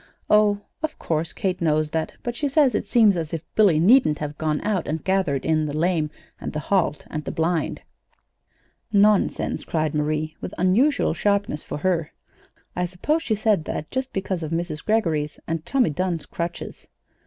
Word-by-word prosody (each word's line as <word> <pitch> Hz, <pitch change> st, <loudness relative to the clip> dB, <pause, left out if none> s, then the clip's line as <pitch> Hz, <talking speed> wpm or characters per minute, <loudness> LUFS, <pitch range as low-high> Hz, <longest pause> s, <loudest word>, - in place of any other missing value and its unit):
"Oh, 210 Hz, -1 st, +4 dB, 0.2 s
of 315 Hz, 0 st, -3 dB
course 160 Hz, 0 st, -1 dB
Kate 185 Hz, -2 st, -2 dB
knows 155 Hz, -2 st, +1 dB
that; 160 Hz, -1 st, -2 dB
but 240 Hz, -1 st, -3 dB
she 290 Hz, -, -1 dB
says 280 Hz, -2 st, +3 dB
it 210 Hz, -, -1 dB
seems 215 Hz, -3 st, +5 dB
as 165 Hz, -1 st, -3 dB
if 160 Hz, -, -6 dB
Billy 200 Hz, -7 st, +5 dB
needn't 185 Hz, -, +5 dB
have 150 Hz, -1 st, -5 dB
gone 155 Hz, -1 st, -1 dB
out 200 Hz, -6 st, -1 dB
and 155 Hz, +1 st, -3 dB
gathered 190 Hz, -8 st, 0 dB
in 155 Hz, -1 st, +2 dB
the 145 Hz, +1 st, -3 dB
lame 165 Hz, -2 st, +1 dB, 0.3 s
and -, -, -5 dB
the 155 Hz, -, -2 dB
halt 165 Hz, -2 st, 0 dB
and 155 Hz, -1 st, -3 dB
the -, -, -4 dB
blind." 165 Hz, 0 st, -1 dB, 1.1 s
"Nonsense!" 205 Hz, -1 st, +2 dB
cried 155 Hz, -2 st, -1 dB
Marie, 155 Hz, +1 st, -1 dB
with -, -, -6 dB
unusual 235 Hz, -, +3 dB
sharpness 200 Hz, -7 st, 0 dB
for -, -, -5 dB
her. 170 Hz, -1 st, -1 dB, 0.6 s
"I 180 Hz, 0 st, 0 dB
suppose 295 Hz, -, -1 dB
she 225 Hz, -9 st, 0 dB
said 210 Hz, -6 st, +1 dB
that 150 Hz, -, -5 dB
just 260 Hz, 0 st, -2 dB
because 190 Hz, -2 st, -2 dB
of 155 Hz, -, -4 dB
Mrs. 165 Hz, -2 st, -3 dB
Greggory's 160 Hz, -9 st, 0 dB
and 165 Hz, -1 st, -3 dB
Tommy 260 Hz, -, +2 dB
Dunn's 175 Hz, 0 st, -2 dB
crutches." 170 Hz, 0 st, -6 dB
175 Hz, 175 wpm, -23 LUFS, 155-210 Hz, 1.1 s, seems